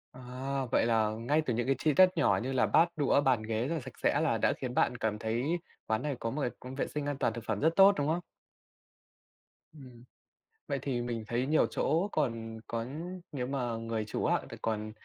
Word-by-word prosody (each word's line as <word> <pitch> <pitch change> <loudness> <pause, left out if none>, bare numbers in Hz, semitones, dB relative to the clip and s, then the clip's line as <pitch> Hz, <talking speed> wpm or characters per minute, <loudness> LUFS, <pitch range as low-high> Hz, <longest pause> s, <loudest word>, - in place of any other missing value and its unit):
À, 130 +2 -4
vậy - - +3
là 110 -2 +2
ngay 120 +8 0
từ 125 - 0
những 120 +1 -1
cái 135 - +3
chi 150 +1 +2
tiết 185 +4 +7
nhỏ 95 -2 +3
như 130 - -2
là 130 - +3
bát 165 +1 +4
đũa, 145 -1 +3
bàn 130 -5 +2
ghế 110 +2 -1
rất 165 - -1
là 160 - -3
sạch - - -11
sẽ - - +3
là - - +2
đã - - +2
khiến 125 -1 -5
bạn 125 - +2
cảm 110 -2 -1
thấy 120 +11 -1 0.3
quán 110 +1 0
này 145 -1 -2
có 115 - -2
một 150 +6 -3
cái 125 - +1
cũng 130 +1 -8
vệ 140 - -1
sinh 150 -1 -4
an 145 -1 -2
toàn - - 0
thực 115 - -6
phẩm 110 -2 -1
rất 165 +1 +2
tốt, 195 +1 +8
đúng 145 - 0
không? 160 +3 +1 1.5
Ừm. 125 -5 -13 0.6
Vậy 140 - -1
thì 130 -3 -1
mình 120 -2 -3
thấy 120 +2 0
nhiều 155 +3 +3
chỗ 165 +7 0
còn 115 -6 -2
có 115 0 -3 0.5
nếu 125 -3 -3
mà 125 -4 -2
người 115 -1 -3
chủ 110 - -3
á, - - +2
thì - - -8
còn 110 -1 -2
125 Hz, 230 wpm, -31 LUFS, 115-145 Hz, 1.5 s, tốt